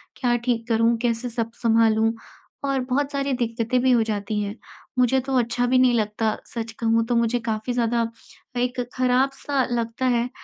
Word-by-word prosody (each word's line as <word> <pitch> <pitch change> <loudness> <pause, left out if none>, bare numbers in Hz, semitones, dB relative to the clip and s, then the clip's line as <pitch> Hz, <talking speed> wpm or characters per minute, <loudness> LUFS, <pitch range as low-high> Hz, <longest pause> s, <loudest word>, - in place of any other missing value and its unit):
क्या 245 -3 +1
ठीक 235 -1 0
करूँ, 230 +1 +3
कैसे 240 0 -1
सब 230 -1 -3
संभालूँ 225 -1 +4 0.6
और 270 -1 +1
बहुत 280 +2 0
सारी 275 -1 -1
दिक्कतें 235 0 0
भी 260 - +3
हो 235 -2 +4
जाती 210 +1 -2
हैं। 205 +1 -4 0.4
मुझे 250 +1 +4
तो 265 0 -1
अच्छा 240 +1 0
भी 255 +1 +3
नहीं 255 -1 +5
लगता 215 +1 -1 0.2
सच 225 -1 -3
कहूँ 230 0 +2
तो 240 - +1
मुझे 235 +1 +2
काफ़ी 220 +2 -1
ज़्यादा 235 -1 +1 0.5
एक 250 +1 -1 0.2
खराब 255 +1 +3 0.2
सा 280 -2 +1
लगता 235 +2 -2
है 240 +1 -1
235 Hz, 180 wpm, -23 LUFS, 225-250 Hz, 0.6 s, नहीं